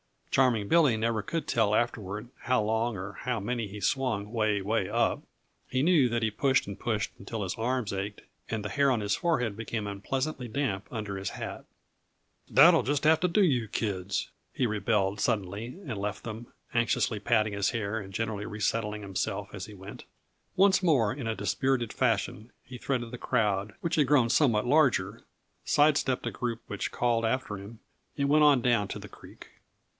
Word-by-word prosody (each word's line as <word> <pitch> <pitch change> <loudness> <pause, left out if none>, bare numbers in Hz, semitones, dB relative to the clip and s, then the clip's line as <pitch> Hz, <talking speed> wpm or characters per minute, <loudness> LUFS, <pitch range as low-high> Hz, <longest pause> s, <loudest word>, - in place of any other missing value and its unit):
Charming 120 -6 +2
Billy 155 -8 +5
never 110 0 0
could 165 +9 -3
tell 110 -4 +2
afterward 105 -1 -2
how 125 -3 +2
long 110 +2 0
or 95 +2 -6
how 125 -2 -1
many 115 +2 -2
he 100 +1 -9
swung 110 -2 0
'way, 110 -3 +1
'way 100 -1 0
up; 115 +2 +1 0.5
he 130 +1 0
knew 160 -6 +5
that 115 -1 -1
he 110 - +1
pushed 135 +5 +2
and 100 -1 -7
pushed 110 -3 -1
until 105 +2 -5
his 95 - -2
arms 120 -1 -1
ached 100 +2 -4 0.3
and 110 -2 -2
the 105 - -3
hair 140 +6 +2
on 120 -4 +1
his 100 -1 0
forehead 125 -9 0
became 110 -1 -3
unpleasantly 130 +7 -3
damp 110 -5 -2
under 105 -4 -4
his 95 -1 -4
hat. - - -7 0.8
"That'll 165 +4 +7
just 145 +1 -1
about - - +7
have 160 0 +5
to 180 - +2
do 195 +4 +3
yuh, 125 -10 +2
kids," 100 -3 -2 0.2
he 130 - 0
rebelled 105 -2 0
suddenly 110 - -2
and 115 -6 -4
left 100 0 -4
them, 115 +1 -7 0.3
anxiously 115 -2 +1
patting 110 0 +1
his 100 -1 +1
hair 110 -2 -2
and 95 -2 -9
generally 110 0 -2
resettling 105 0 -2
himself 95 -2 -3
as - - -5
he 105 - -11
went. 95 +1 -10 0.5
Once 190 0 +5
more 135 - +3
in 130 -4 -5
a 110 - -1
dispirited 120 +4 0
fashion 115 -1 -1
he 130 - -9
threaded 120 -2 -2
the 125 - -6
crowd, 105 -5 0
which 170 -1 -1
had 150 -4 +3
grown 130 -4 +4
somewhat 120 -5 +3
larger, 120 -8 +2 0.4
side 145 0 +4
stepped 130 -3 -1
a - - -1
group 120 -2 -3
which 100 - -3
called 120 -2 +1
after 115 -3 -1
him, 105 +4 -10 0.4
and 140 -1 +1
went 150 +1 +5
on 140 -4 +5
down 115 -4 +2
to - - -5
the - - -10
creek. - - -14
115 Hz, 190 wpm, -29 LUFS, 105-130 Hz, 0.8 s, That'll